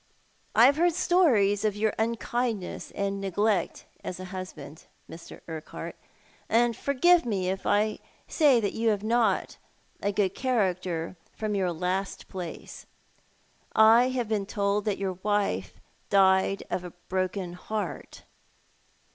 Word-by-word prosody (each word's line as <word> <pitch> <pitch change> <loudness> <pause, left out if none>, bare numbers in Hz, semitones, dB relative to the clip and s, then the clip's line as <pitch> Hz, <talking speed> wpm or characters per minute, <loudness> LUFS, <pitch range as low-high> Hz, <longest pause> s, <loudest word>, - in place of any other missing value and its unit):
" - - -39
I 225 +3 +8
have 280 +3 +5
heard 345 0 +3
stories 260 - +3
of 210 -2 +1
your 215 +1 0
unkindness 230 -2 -2
and 200 0 -2
neglect 195 -1 0 0.2
as 180 - -5
a 185 - -6
husband, 160 -5 -8 0.2
Mr. 165 - -11
Urquhart. 160 -2 -7 0.8
Forgive 335 +9 +3
me 195 -6 -1
if 190 - -5
I 215 +1 +2 0.3
say 285 -7 +4
that 205 -3 -1
you 225 0 +1
have 205 -2 0
not 225 -3 +1 0.4
a 200 - 0
good 195 -2 0
character 185 -9 -1 0.2
from 215 -1 -3
your 190 -3 0
last 180 +3 -3
place. 180 -4 -8 0.9
I 225 +3 +6
have 250 -3 -2
been 210 -2 -1
told 200 0 0
that 210 -2 0
your 190 -2 -3
wife 200 - -1 0.3
died 190 0 +3
of 180 - -1
a 180 - -8
broken 185 -1 -2
heart." 210 +4 -5
200 Hz, 135 wpm, -27 LUFS, 185-225 Hz, 0.9 s, I